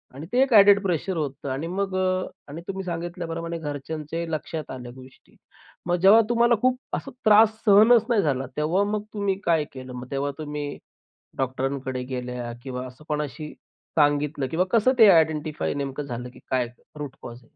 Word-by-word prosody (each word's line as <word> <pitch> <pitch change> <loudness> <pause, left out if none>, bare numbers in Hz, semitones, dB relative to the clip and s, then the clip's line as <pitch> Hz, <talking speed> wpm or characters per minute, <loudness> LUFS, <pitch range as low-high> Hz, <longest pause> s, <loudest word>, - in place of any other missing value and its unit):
आणि 145 +4 -7
ते 250 - +4
एक 270 -2 -1
ॲडेड 200 -1 +7
प्रेशर 185 0 -1
होतं 140 -2 -4
आणि 135 +5 -3
मग 195 +2 -2
अ, 185 0 0 0.2
आणि 155 +4 -7
तुम्ही 195 0 -4
सांगितल्याप्रमाणे 170 -1 -4
घरच्यांच्याही 155 +2 -5
लक्षात 155 0 -4
आल्या 125 -2 -7
गोष्टी. 130 0 -16 0.5
मग 175 0 +1
जेव्हा 200 +4 +8
तुम्हाला 235 0 +4
खूप 255 0 +3 0.2
असा 275 - -3
त्रास 215 +1 +7
सहनच 220 +2 +6
नाही 230 -4 +3
झाला, 135 -6 0
तेव्हा 160 +6 +2
मग 210 -1 -1
तुम्ही 200 -2 0
काय 165 -3 +3
केलं? 130 -1 -9
मग 125 0 -8
तेव्हा 140 +1 -1
तुम्ही 150 -2 -5 0.6
डॉक्टरांकडे 130 0 -2
गेल्या 125 -2 -5
किंवा 130 -1 -5
असं 130 +4 -13
कोणाशी 150 0 -4 0.5
सांगितलं 145 -1 +2
किंवा 170 +5 +1
कसं 230 +4 +4
ते 220 -3 +9
आयडेंटिफाय 155 -4 +2
नेमकं 140 0 -3
झालं 125 -2 -6
की - - -14
काय 130 -2 +1 0.3
रूट 145 -2 -6
कॉज? 120 +1 -9
155 Hz, 170 wpm, -25 LUFS, 135-190 Hz, 0.6 s, ते